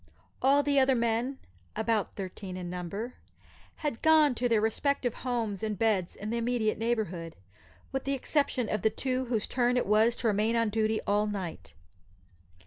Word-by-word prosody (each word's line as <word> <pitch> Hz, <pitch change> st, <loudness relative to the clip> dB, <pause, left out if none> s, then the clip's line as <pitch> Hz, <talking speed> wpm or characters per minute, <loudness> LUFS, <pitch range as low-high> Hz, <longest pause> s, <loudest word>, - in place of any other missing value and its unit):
All 280 Hz, +2 st, +4 dB
the 285 Hz, 0 st, +3 dB
other 265 Hz, 0 st, +4 dB
men 235 Hz, +3 st, 0 dB, 0.4 s
about 220 Hz, -2 st, 0 dB
thirteen 190 Hz, -1 st, -6 dB
in 175 Hz, -1 st, -5 dB
number 195 Hz, +7 st, -5 dB, 0.7 s
had 285 Hz, -6 st, -2 dB
gone 315 Hz, -3 st, +5 dB
to 245 Hz, +1 st, -1 dB
their 225 Hz, -2 st, +4 dB
respective 245 Hz, +3 st, 0 dB
homes 230 Hz, -7 st, -2 dB
and 215 Hz, -2 st, -2 dB
beds 205 Hz, -5 st, +1 dB
in 210 Hz, +2 st, -5 dB
the 235 Hz, -, 0 dB
immediate 230 Hz, -3 st, 0 dB
neighbourhood, 205 Hz, -8 st, -2 dB, 0.6 s
with 270 Hz, -, -3 dB
the 275 Hz, 0 st, 0 dB
exception 270 Hz, -3 st, 0 dB
of 210 Hz, -1 st, -1 dB
the 220 Hz, -, +3 dB
two 260 Hz, +2 st, -2 dB
whose 230 Hz, -4 st, -1 dB
turn 245 Hz, 0 st, +1 dB
it -, -, +1 dB
was 220 Hz, +3 st, +4 dB
to 240 Hz, -, -1 dB
remain 215 Hz, +2 st, +2 dB
on 230 Hz, -1 st, +2 dB
duty 220 Hz, +1 st, 0 dB
all 205 Hz, +1 st, +2 dB
night. 195 Hz, -5 st, -5 dB
225 Hz, 170 wpm, -29 LUFS, 210-250 Hz, 0.7 s, gone